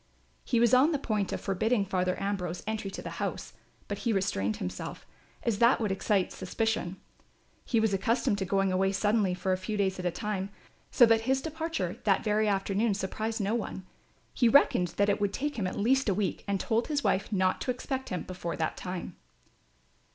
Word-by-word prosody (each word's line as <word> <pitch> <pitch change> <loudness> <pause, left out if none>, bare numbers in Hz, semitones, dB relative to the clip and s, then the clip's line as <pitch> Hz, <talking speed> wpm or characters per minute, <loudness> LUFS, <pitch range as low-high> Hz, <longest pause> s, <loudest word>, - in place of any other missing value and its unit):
He 240 - +1
was 235 0 +4
on 275 +6 +6
the - - +2
point 215 -7 -1
of - - -2
forbidding 210 +2 +1
Father 185 -1 0
Ambrose 185 -3 -3
entry 215 -2 -3
to - - -7
the - - -7
house; - - -4 0.3
but - - -4
he 235 - 0
restrained 110 - 0
himself, 90 0 -6 0.4
as 220 -3 0
that 235 +2 +5
would 215 -4 0
excite 195 0 +1
suspicion. 195 -2 -2 0.7
He 230 - +2
was 220 -2 +2
accustomed 215 +1 +1
to 190 - -1
going 195 +1 +1
away 190 +1 +2
suddenly 205 -2 +2
for 185 +1 -1
a - - 0
few 210 +2 -3
days 190 -2 0
at 180 - -4
a - - +3
time, 195 +2 -3 0.4
so 245 - +7
that 225 -1 +4
his 265 0 +3
departure 315 - -3
that 195 -3 +3
very 215 0 +2
afternoon 200 +2 +1
surprised 215 +3 -3
no 200 +2 0
one. 210 -5 -3 0.5
He 240 - +3
reckoned 230 -9 +5
that 200 - +3
it 205 0 +1
would 200 -1 +1
take 290 -2 -2
him 190 - 0
at - - -5
least 260 +3 +2
a 195 - +2
week 200 -2 -1
and 200 -1 0
told 225 +5 0
his 290 -3 -1
wife 200 +1 +1
not 185 -2 +1
to - - -3
expect 260 +1 -3
him 180 - -3
before 180 -2 -5
that 160 -1 -1
time. 180 -1 -5
200 Hz, 205 wpm, -29 LUFS, 190-230 Hz, 0.7 s, so